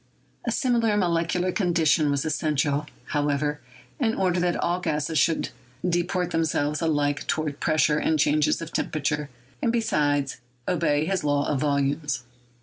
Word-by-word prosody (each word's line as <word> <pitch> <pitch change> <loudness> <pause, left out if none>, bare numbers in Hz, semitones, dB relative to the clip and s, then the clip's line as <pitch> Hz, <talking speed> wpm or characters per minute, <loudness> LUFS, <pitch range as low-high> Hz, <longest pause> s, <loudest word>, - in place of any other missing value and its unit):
A - - +2
similar 235 -6 +2
molecular 175 0 +1
condition 165 -5 +2
was 140 +1 0
essential, 150 -1 0 0.2
however, 145 0 0 0.4
in 225 -5 +1
order 185 -2 +1
that 175 0 +1
all 175 +1 0
gases 155 -2 0
should 165 +3 +2 0.4
de 175 0 +2
port 180 0 -2
themselves 150 -2 0
alike 145 -3 0
toward 155 -2 -1
pressure 155 -1 +2
and 160 - +1
changes 150 +2 +2
of 165 - -9
temperature, 150 -1 -1 0.3
and, 230 - +2
besides, 145 - +1 0.3
obey 155 -4 +1
his 190 -1 -1
law 145 -1 +1
of 145 - 0
volumes. 140 -1 0
155 Hz, 145 wpm, -25 LUFS, 145-175 Hz, 0.4 s, A